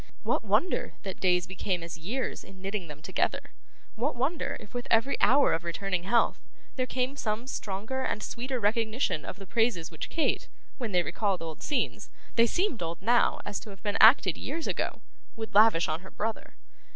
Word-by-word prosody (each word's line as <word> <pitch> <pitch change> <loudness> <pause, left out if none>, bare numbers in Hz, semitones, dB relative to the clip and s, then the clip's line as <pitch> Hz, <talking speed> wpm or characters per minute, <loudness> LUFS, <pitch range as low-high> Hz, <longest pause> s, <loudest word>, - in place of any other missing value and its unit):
What - - +1
wonder 360 - +1
that 190 -2 -5
days 180 -2 +3
became 185 -1 -2
as 170 -1 -6
years 210 +11 -3
in 190 -1 -14
knitting 195 -1 -3
them 150 0 -10
together! 190 +2 -1 0.4
What 250 +6 -1
wonder, 280 +7 -1
if 205 - -13
with 245 +1 -4
every 230 +5 +3
hour 275 +2 +5
of 165 - -1
returning 180 +1 -2
health, 235 +4 +3 0.4
there 255 -1 -1
came 255 +2 -1
some 220 -2 -2
stronger 220 +1 -3
and 215 -4 -2
sweeter 255 +1 -3
recognition 220 - +1
of - - -6
the 195 - -9
praises 185 -4 +1
which 160 - -6
Kate, 320 - 0 0.3
when 235 -4 -3
they 180 -2 +3
recalled 195 -1 -1
old 160 -2 -7
scenes 290 - -1 0.3
they 230 0 +6
seemed 345 - 0
old 165 0 -3
now, 235 +5 +3
and 205 - -5
to - - -10
have 195 -2 -12
been 205 -1 0
acted 215 - +7
years 320 +5 -3
ago - - -2 0.3
would 220 -1 -6
lavish 205 -5 +6
on 155 +1 -1
her 190 +1 -12
brother! 220 +1 -4
215 Hz, 190 wpm, -29 LUFS, 185-245 Hz, 0.4 s, acted